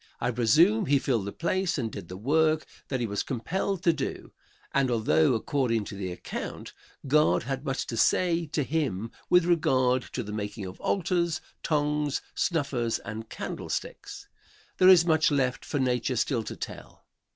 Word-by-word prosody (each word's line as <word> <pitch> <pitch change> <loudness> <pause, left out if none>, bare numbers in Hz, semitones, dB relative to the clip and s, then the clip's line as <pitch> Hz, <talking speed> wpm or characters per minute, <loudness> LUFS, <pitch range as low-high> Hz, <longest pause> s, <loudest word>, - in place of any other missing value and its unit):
I 125 - 0
presume 165 - +4
he 140 - +4
filled 120 -6 0
the 100 - -4
place 185 - -1
and 115 -5 -2
did 85 - -8
the 90 - -8
work 155 +7 +2 0.2
that 130 - -2
he 120 - 0
was 100 -2 -2
compelled 180 - -2
to 170 - +4
do, 140 -3 -5 0.4
and 135 -2 +2
although 110 -4 +3
according 115 -1 0
to 100 - -7
the 95 -2 -4
account 90 - -6 0.3
God 150 0 +3
had 135 +2 -3
much 135 -2 -2
to 115 - -5
say 170 +6 +2
to 150 0 -1
him 130 - -2 0.2
with 180 -1 +5
regard 130 -7 +3
to 125 - -2
the 105 0 -7
making 105 -1 -4
of 95 0 -9
altars, 175 -3 0 0.2
tongs, 150 -1 0
snuffers 135 -8 0
and 110 +1 -7
candlesticks, - - -5 0.5
there 185 - +7
is 175 -3 +8
much 160 -1 +3
left 130 -4 0
for 145 - -3
nature 125 -1 0
still 120 +1 0
to - - -6
tell. - - -9
135 Hz, 170 wpm, -27 LUFS, 115-160 Hz, 0.5 s, is